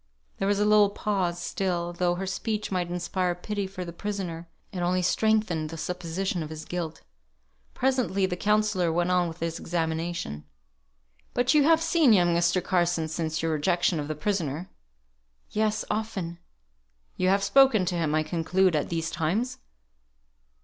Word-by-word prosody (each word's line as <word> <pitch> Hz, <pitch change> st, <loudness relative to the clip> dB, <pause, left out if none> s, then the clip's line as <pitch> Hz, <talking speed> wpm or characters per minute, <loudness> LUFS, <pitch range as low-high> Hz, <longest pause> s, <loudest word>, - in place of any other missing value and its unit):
There 195 Hz, -, 0 dB
was 205 Hz, 0 st, +2 dB
a 210 Hz, -, +3 dB
little 210 Hz, -1 st, +5 dB
pause; 190 Hz, -4 st, -1 dB
still, 175 Hz, -1 st, -2 dB
though 175 Hz, 0 st, +1 dB
her 190 Hz, +2 st, -3 dB
speech 210 Hz, +2 st, -3 dB
might 180 Hz, -2 st, -1 dB
inspire 180 Hz, 0 st, -1 dB
pity 200 Hz, +2 st, -3 dB
for 185 Hz, -1 st, -6 dB
the 170 Hz, -, -7 dB
prisoner, 175 Hz, -4 st, -5 dB, 0.2 s
it 185 Hz, -, -5 dB
only 180 Hz, +1 st, +1 dB
strengthened 185 Hz, -5 st, +1 dB
the 165 Hz, -, -7 dB
supposition 180 Hz, +2 st, -3 dB
of 155 Hz, -, -5 dB
his 155 Hz, 0 st, -7 dB
guilt. 170 Hz, -3 st, -5 dB, 0.7 s
Presently 250 Hz, -7 st, +1 dB
the 180 Hz, -1 st, -2 dB
counsellor 210 Hz, -3 st, +1 dB
went 175 Hz, +2 st, +1 dB
on 180 Hz, -1 st, +3 dB
with 165 Hz, 0 st, -8 dB
his 165 Hz, 0 st, -2 dB
examination. 165 Hz, -, -3 dB, 0.9 s
"But 245 Hz, +3 st, +3 dB
you 295 Hz, -2 st, +5 dB
have 325 Hz, +1 st, +4 dB
seen 325 Hz, -7 st, +4 dB
young 175 Hz, -3 st, +4 dB
Mr. 170 Hz, +1 st, +2 dB
Carson 175 Hz, -3 st, +1 dB
since 160 Hz, 0 st, -2 dB
your 165 Hz, -, +1 dB
rejection 175 Hz, +2 st, +1 dB
of 145 Hz, -, -3 dB
the 155 Hz, -, -3 dB
prisoner?" 170 Hz, -1 st, -2 dB, 0.8 s
"Yes, 215 Hz, 0 st, 0 dB
often." 190 Hz, -6 st, -3 dB, 0.8 s
"You 185 Hz, -, +1 dB
have 195 Hz, +1 st, +3 dB
spoken 220 Hz, -2 st, +5 dB
to 180 Hz, 0 st, -1 dB
him, 160 Hz, -3 st, 0 dB
I 155 Hz, -, +2 dB
conclude, 170 Hz, +3 st, +1 dB
at 150 Hz, -, 0 dB
these 165 Hz, -1 st, -2 dB
times." 210 Hz, +11 st, -1 dB
180 Hz, 165 wpm, -27 LUFS, 165-200 Hz, 0.9 s, little